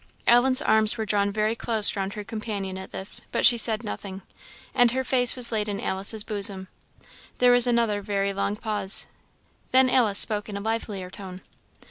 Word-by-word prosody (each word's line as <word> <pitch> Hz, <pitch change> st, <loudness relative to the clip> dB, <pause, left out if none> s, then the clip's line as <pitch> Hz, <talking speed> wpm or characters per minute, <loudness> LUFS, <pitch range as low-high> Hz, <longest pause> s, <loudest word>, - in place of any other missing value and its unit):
Ellen's 255 Hz, +4 st, +3 dB
arms 220 Hz, +1 st, +3 dB
were 220 Hz, -, -4 dB
drawn 200 Hz, -1 st, -1 dB
very 215 Hz, +2 st, -2 dB
close 220 Hz, -3 st, 0 dB
round 195 Hz, 0 st, -5 dB
her 210 Hz, -, -7 dB
companion 205 Hz, -3 st, -7 dB
at 190 Hz, 0 st, -10 dB
this, 190 Hz, +1 st, +5 dB
but -, -, -1 dB
she 240 Hz, -, +7 dB
said 225 Hz, -1 st, +4 dB
nothing, 195 Hz, -3 st, -8 dB, 0.5 s
and 245 Hz, -2 st, +3 dB
her 260 Hz, 0 st, -3 dB
face 245 Hz, -2 st, +3 dB
was 245 Hz, -2 st, -1 dB
laid 210 Hz, -2 st, -3 dB
in 200 Hz, -, -5 dB
Alice's 200 Hz, +3 st, +1 dB
bosom. 200 Hz, -3 st, -1 dB, 0.7 s
There 250 Hz, 0 st, +3 dB
was 245 Hz, 0 st, +2 dB
another 230 Hz, -4 st, -1 dB
very 200 Hz, 0 st, -3 dB
long 200 Hz, +1 st, -3 dB
pause. 210 Hz, -2 st, -1 dB, 0.6 s
Then 260 Hz, 0 st, +2 dB
Alice 220 Hz, -6 st, +1 dB
spoke 210 Hz, -1 st, -1 dB
in 200 Hz, -, -7 dB
a -, -, -6 dB
livelier 205 Hz, -4 st, -6 dB
tone. 185 Hz, -1 st, -11 dB
215 Hz, 180 wpm, -23 LUFS, 200-235 Hz, 0.7 s, she